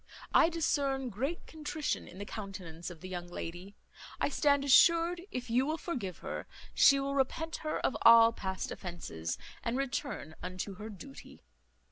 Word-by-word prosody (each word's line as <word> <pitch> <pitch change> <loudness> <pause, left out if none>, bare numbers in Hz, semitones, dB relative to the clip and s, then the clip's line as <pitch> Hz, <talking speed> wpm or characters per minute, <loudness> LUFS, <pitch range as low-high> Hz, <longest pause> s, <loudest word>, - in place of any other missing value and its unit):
I 330 - +6
discern 280 -5 0
great 270 - -3
contrition 310 0 -3
in 180 - -12
the 200 - -5
countenance 185 -6 -7
of 175 -3 -11
the 185 - -7
young 175 -1 -5
lady. 175 +3 -7 0.4
I - - +1
stand 285 -1 +2
assured, 335 +5 +5
if 250 0 -5
you 250 +3 +4
will 315 +1 -1
forgive 245 - -4
her, - - -5 0.3
she 275 0 +6
will 275 0 -2
repent 300 +4 -1
her 310 -1 -2
of - - +1
all 230 0 +8
past 190 -3 -4
offences, 85 - -5 0.2
and 235 +2 -1
return 275 - -3
unto 185 +2 -5
her 215 +2 -7
duty." 175 -9 -12
240 Hz, 160 wpm, -32 LUFS, 185-285 Hz, 0.4 s, all